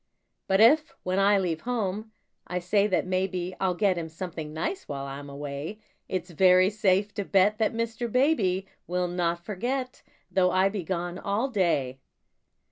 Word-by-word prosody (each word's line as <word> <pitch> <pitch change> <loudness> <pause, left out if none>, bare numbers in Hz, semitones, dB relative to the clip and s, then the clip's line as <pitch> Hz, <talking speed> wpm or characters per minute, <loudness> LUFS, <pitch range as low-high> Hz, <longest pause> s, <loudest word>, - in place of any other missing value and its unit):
But 190 0 +3
if, 295 +8 +6
when 185 +1 0
I 200 +1 +5
leave 175 -4 -1
home, 220 -3 -2 0.4
I 180 - -3
say 200 +3 +2
that 185 -3 +1
maybe 185 -1 -1
I'll 185 -2 +1
get 190 -2 +2
him 160 -1 -5
something 160 -2 -6
nice 170 - -3
while 140 -1 -4
I'm 140 +1 -7
away, 145 +7 -6 0.3
It's 185 -1 -3
very 185 +3 +5
safe 205 -1 +1
to 200 - -2
bet 200 +3 +3
that 220 - +2
Mr. 230 0 -2
Baby 220 - +2 0.2
Will 180 0 0
not 170 -1 -1
forget, 250 +6 -3 0.3
though 185 -1 +3
I 185 +2 +3
be 195 -2 -4
gone 175 +1 -3
all 210 +7 -1
day. 165 - 0
185 Hz, 165 wpm, -27 LUFS, 175-210 Hz, 0.4 s, if